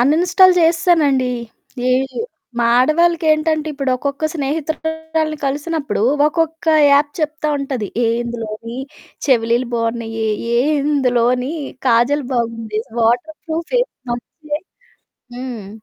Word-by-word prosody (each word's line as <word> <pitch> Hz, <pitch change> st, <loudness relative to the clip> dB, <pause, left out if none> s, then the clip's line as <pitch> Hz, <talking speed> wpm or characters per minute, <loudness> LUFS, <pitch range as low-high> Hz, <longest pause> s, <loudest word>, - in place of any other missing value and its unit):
Uninstall 355 Hz, +8 st, +5 dB
చేసేశానండి. 325 Hz, -6 st, +3 dB, 0.6 s
ఏవీయు 265 Hz, -, 0 dB, 0.4 s
మా 235 Hz, -, +2 dB
ఆడవాళ్ళకేంటంటే, 315 Hz, +1 st, +2 dB
ఇప్పుడొక్కొక్క 275 Hz, +1 st, -2 dB
స్నేహితురాలిని 315 Hz, +1 st, -2 dB
కలిసినప్పుడు, 290 Hz, -2 st, -2 dB, 0.2 s
ఒక్కొక్కా 325 Hz, 0 st, +1 dB, 0.2 s
app 285 Hz, +1 st, +4 dB
చెప్తా 305 Hz, 0 st, -1 dB
ఉంటది. 265 Hz, -7 st, -3 dB, 0.2 s
ఏహ్! 230 Hz, 0 st, +2 dB
ఇందులోనీ 230 Hz, 0 st, -6 dB, 0.5 s
చెవిలీలు 235 Hz, -1 st, +2 dB
బావున్నయీ, 230 Hz, -1 st, -2 dB, 0.3 s
ఏహ్! 280 Hz, +6 st, +2 dB
ఇందులోని 250 Hz, -2 st, +1 dB, 0.4 s
కాజల్ 250 Hz, +5 st, +3 dB
బాగుంది, 230 Hz, -2 st, -2 dB, 0.2 s
వాటర్ 240 Hz, +7 st, +1 dB
ప్రూఫే, 335 Hz, +10 st, -1 dB, 0.3 s
మంచియే. 295 Hz, +5 st, -5 dB, 0.8 s
హ్మ్. 245 Hz, -6 st, -6 dB
280 Hz, 90 wpm, -18 LUFS, 240-315 Hz, 0.8 s, Uninstall